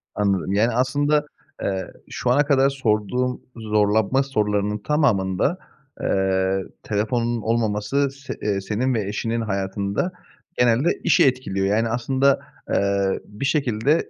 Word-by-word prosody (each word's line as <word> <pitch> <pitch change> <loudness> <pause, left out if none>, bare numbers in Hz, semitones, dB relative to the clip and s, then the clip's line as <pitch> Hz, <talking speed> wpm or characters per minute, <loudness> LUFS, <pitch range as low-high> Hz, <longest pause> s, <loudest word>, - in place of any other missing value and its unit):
Anladım. 100 -2 0
Yani, 110 +4 +3
aslında, 145 +4 +2 0.4
eee, 95 -2 -2 0.2
şu 125 - -2
ana 145 +3 +4
kadar 135 -2 +4
sorduğum 125 -1 0
zorlanma 110 +3 +2
sorularının 105 -5 0
tamamında, 110 - +1 0.4
eee, 95 0 +1 0.2
telefonun 115 +2 -1
olmaması 115 +4 0
se 140 0 -7
eee, 100 -2 0
senin 120 +6 -1
ve 105 -4 -1
eşinin 115 +2 -2
hayatında 100 - -2 0.5
genelde 125 +6 +3
işi 150 - +5
etkiliyor, 125 -7 0
yani, 110 +3 +1
aslında, 130 +4 +2 0.3
eee, 100 -1 +1
bir 105 +6 -6
şekilde 135 +1 +1
110 Hz, 120 wpm, -23 LUFS, 100-130 Hz, 0.5 s, işi